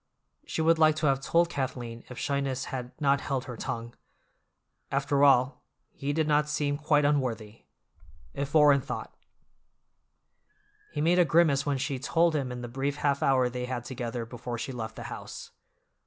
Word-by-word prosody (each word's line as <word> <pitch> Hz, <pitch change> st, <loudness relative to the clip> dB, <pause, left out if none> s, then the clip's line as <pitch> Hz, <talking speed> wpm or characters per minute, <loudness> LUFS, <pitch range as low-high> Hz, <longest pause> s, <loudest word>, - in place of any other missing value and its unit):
She 160 Hz, -, -1 dB
would 165 Hz, 0 st, +4 dB
like 155 Hz, -1 st, +5 dB
to 155 Hz, -, -2 dB
have 135 Hz, -2 st, +3 dB
told 170 Hz, +4 st, +3 dB
Kathleen 125 Hz, -6 st, -4 dB
if 125 Hz, -, -9 dB
shyness 135 Hz, -2 st, -1 dB
had 125 Hz, -1 st, -4 dB
not 140 Hz, -2 st, +2 dB
held 135 Hz, -2 st, -2 dB
her 125 Hz, -, -7 dB
tongue. 115 Hz, +1 st, -5 dB, 1.0 s
After 140 Hz, +1 st, +1 dB
all, 130 Hz, -1 st, +4 dB, 0.3 s
he 140 Hz, +1 st, -3 dB
did 155 Hz, +1 st, 0 dB
not 150 Hz, 0 st, +2 dB
seem 145 Hz, -1 st, -1 dB
quite 150 Hz, -1 st, +2 dB
unworthy. 120 Hz, -7 st, -1 dB, 0.7 s
If 140 Hz, +2 st, -4 dB
Orrin 145 Hz, -2 st, +6 dB
thought— 140 Hz, -, -6 dB, 1.8 s
He -, -, -3 dB
made 175 Hz, +3 st, +3 dB
a -, -, +7 dB
grimace 155 Hz, -4 st, +3 dB
when 140 Hz, -1 st, +1 dB
she 130 Hz, 0 st, -2 dB
told 165 Hz, +4 st, +2 dB
him 135 Hz, -4 st, -1 dB
in 125 Hz, 0 st, -6 dB
the 120 Hz, -, -5 dB
brief 135 Hz, +4 st, -2 dB
half 140 Hz, -1 st, 0 dB
hour 130 Hz, -2 st, +3 dB
they 125 Hz, 0 st, -4 dB
had 125 Hz, -1 st, -4 dB
together 120 Hz, -2 st, -4 dB
before 120 Hz, 0 st, -6 dB
she 115 Hz, +3 st, -4 dB
left 110 Hz, -3 st, -6 dB
the -, -, -7 dB
house. -, -, -8 dB
140 Hz, 170 wpm, -28 LUFS, 125-150 Hz, 1.8 s, a